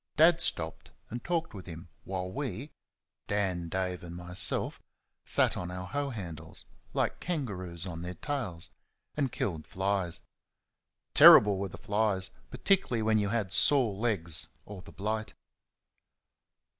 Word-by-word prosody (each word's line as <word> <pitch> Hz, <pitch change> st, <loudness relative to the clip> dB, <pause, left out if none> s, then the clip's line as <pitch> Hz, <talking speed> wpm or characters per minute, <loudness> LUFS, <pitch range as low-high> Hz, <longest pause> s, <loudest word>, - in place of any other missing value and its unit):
Dad 165 Hz, +2 st, +6 dB
stopped 80 Hz, -1 st, 0 dB, 0.2 s
and 120 Hz, +1 st, -5 dB
talked 170 Hz, -2 st, -1 dB
with 95 Hz, -3 st, -9 dB
him 85 Hz, 0 st, -8 dB, 0.2 s
while 95 Hz, -1 st, -3 dB
we 135 Hz, +1 st, -4 dB, 0.6 s
(Dan, 95 Hz, -4 st, -1 dB
Dave 90 Hz, 0 st, -2 dB
and 85 Hz, 0 st, -8 dB
myself) 90 Hz, +2 st, -1 dB, 0.5 s
sat -, -, +3 dB
on 90 Hz, -, -4 dB
our 90 Hz, 0 st, -5 dB
hoe 140 Hz, +8 st, -2 dB
handles, 85 Hz, -, -6 dB, 0.3 s
like -, -, -1 dB
kangaroos 95 Hz, -, -3 dB
on 85 Hz, -3 st, -6 dB
their 90 Hz, +1 st, -5 dB
tails, 105 Hz, -, -3 dB, 0.4 s
and 140 Hz, -4 st, 0 dB
killed 80 Hz, -6 st, -3 dB
flies. 95 Hz, -2 st, -1 dB, 0.9 s
Terrible 100 Hz, -2 st, +9 dB
were 100 Hz, 0 st, -2 dB
the -, -, -9 dB
flies, 100 Hz, -3 st, 0 dB, 0.2 s
particularly 190 Hz, -, +1 dB
when 110 Hz, 0 st, +3 dB
you 100 Hz, -1 st, 0 dB
had 105 Hz, -4 st, -1 dB
sore 125 Hz, -1 st, +5 dB
legs 95 Hz, -7 st, +1 dB, 0.2 s
or 100 Hz, -3 st, -9 dB
the -, -, -13 dB
blight. 110 Hz, +2 st, -3 dB
100 Hz, 135 wpm, -30 LUFS, 90-115 Hz, 0.9 s, Terrible